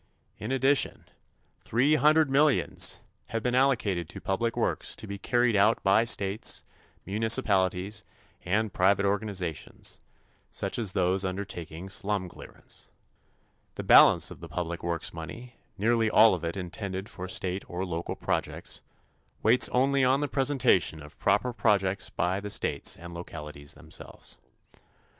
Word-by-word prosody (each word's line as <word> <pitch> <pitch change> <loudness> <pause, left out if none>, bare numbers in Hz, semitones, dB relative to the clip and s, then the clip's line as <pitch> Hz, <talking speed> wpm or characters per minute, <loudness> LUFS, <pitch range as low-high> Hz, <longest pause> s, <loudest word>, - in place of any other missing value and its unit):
In 110 +4 -5
addition, 135 +1 +2 0.6
three 130 +7 +2
hundred 155 -1 +4
millions 145 +1 +2 0.3
have 115 -1 -3
been 125 - 0
allocated 110 - +1
to - - -8
public 115 +5 -2
works - - 0
to - - -6
be 100 -1 -7
carried 120 +1 +1
out 105 +3 +3
by 100 +4 +4
states, 100 -2 0 0.4
municipalities 100 -2 +1 0.4
and 105 +3 0
private 100 +2 +3
organizations, 100 -5 -3 0.5
such - - -4
as 105 -5 -1
those 95 +1 +1
undertaking 95 -3 -5
slum 95 -1 -1
clearance. - - -12 0.9
The - - -5
balance - - +6
of - - -10
the - - -10
public 85 -1 -4
works 85 -1 -2
money, 115 +9 -9 0.2
nearly 115 +2 +2
all 110 0 +6
of 90 - -4
it 85 +3 -3
intended 95 +1 -5
for 90 - -7
state 95 +1 -2
or 90 +2 -3
local 85 -2 -4
projects, - - -3 0.6
waits 115 +4 +5
only 135 +2 +2
on 130 +2 +3
the 145 - -1
presentation 125 - +1
of 75 +1 -15
proper 105 +5 +1
projects 100 -5 +1
by 90 +2 -1
the 105 0 -6
states - - -1
and 85 +1 -10
localities 75 -4 -8
themselves. - - -10
100 Hz, 140 wpm, -28 LUFS, 90-120 Hz, 0.9 s, balance